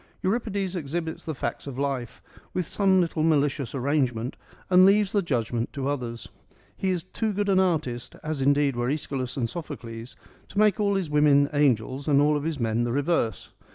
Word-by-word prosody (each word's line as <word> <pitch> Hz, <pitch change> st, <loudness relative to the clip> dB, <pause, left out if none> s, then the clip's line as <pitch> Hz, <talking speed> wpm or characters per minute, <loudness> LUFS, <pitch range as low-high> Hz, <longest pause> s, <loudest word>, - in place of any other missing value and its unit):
Euripides 200 Hz, -2 st, -1 dB
exhibits 160 Hz, 0 st, -4 dB
the 160 Hz, -, -3 dB
facts 145 Hz, -, -4 dB
of 135 Hz, -2 st, -6 dB
life, 135 Hz, -4 st, -3 dB, 0.3 s
with 180 Hz, -, 0 dB
some 190 Hz, +1 st, +3 dB
little 165 Hz, -2 st, -1 dB
malicious 145 Hz, -4 st, +1 dB
arrangement, 130 Hz, -3 st, 0 dB, 0.3 s
and 185 Hz, 0 st, +6 dB
leaves 200 Hz, +1 st, +5 dB
the 205 Hz, -, +2 dB
judgment 120 Hz, -, -1 dB
to 135 Hz, -1 st, -3 dB
others. 120 Hz, -5 st, -4 dB, 0.5 s
He 190 Hz, -, -1 dB
is 180 Hz, -3 st, -1 dB
too 215 Hz, +4 st, -2 dB
good 205 Hz, +1 st, -1 dB
an 190 Hz, -1 st, +4 dB
artist, 155 Hz, -10 st, -1 dB
as 155 Hz, -3 st, -3 dB
indeed 140 Hz, 0 st, +3 dB
were 120 Hz, +1 st, -1 dB
^Eschylus 135 Hz, -3 st, -3 dB
and 120 Hz, -3 st, 0 dB
Sophocles, 120 Hz, -6 st, -7 dB, 0.3 s
to -, -, -11 dB
make 210 Hz, -2 st, +4 dB
all 200 Hz, -1 st, +2 dB
his 185 Hz, -6 st, -2 dB
women 145 Hz, -1 st, +4 dB
angels 135 Hz, -1 st, +1 dB
and 140 Hz, -2 st, +4 dB
all 150 Hz, +1 st, +3 dB
his 155 Hz, 0 st, -3 dB
men 115 Hz, 0 st, 0 dB
the 120 Hz, -, -1 dB
reverse. 140 Hz, -, 0 dB
145 Hz, 180 wpm, -26 LUFS, 130-180 Hz, 0.5 s, and